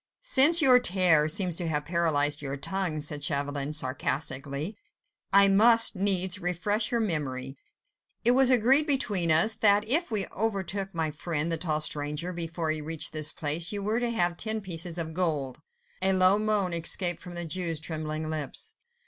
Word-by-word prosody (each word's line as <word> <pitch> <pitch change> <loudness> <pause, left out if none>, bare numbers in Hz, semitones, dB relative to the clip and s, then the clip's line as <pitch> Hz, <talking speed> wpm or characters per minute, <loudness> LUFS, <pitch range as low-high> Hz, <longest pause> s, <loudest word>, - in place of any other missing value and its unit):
"Since 330 - +6
your 255 -3 +6
terror 175 -8 +3
seems 180 +1 0
to 175 - -3
have 150 -2 -2
paralyzed 150 -4 +1
your 140 -1 -5
tongue," 175 0 -3
said 145 -1 -4
Chauvelin, 145 0 -2
sarcastically, 140 +3 -3 0.6
"I 200 0 +6
must 225 +3 +5
needs 190 0 +2
refresh 200 +5 -2
your 235 - -1
memory. 135 - -3 0.7
It 240 - +7
was 260 0 +3
agreed 260 +5 +4
between 210 - 0
us, 165 +8 +5
that 210 -1 +2
if 325 +9 +3
we 210 -4 +2
overtook 195 -2 -3
my 160 -2 -2
friend 160 +1 -4
the 165 - -1
tall 155 -2 -2
stranger, 150 +4 -3
before 165 -1 -4
he 155 -1 -4
reached 160 +1 -2
this 155 -1 -1
place, 160 +3 -1
you 205 -1 -3
were 215 +3 -1
to 240 -1 -2
have 175 -7 -1
ten 220 0 -2
pieces 175 -2 -6
of 160 -1 -5
gold." 155 -6 -3 0.4
A 190 0 +2
low 185 +2 +3
moan 210 -4 0
escaped 170 +1 0
from 175 -1 -11
the 175 0 -4
Jew's 165 -1 -3
trembling 155 0 -5
lips. 155 -3 -4
175 Hz, 170 wpm, -26 LUFS, 155-205 Hz, 0.7 s, It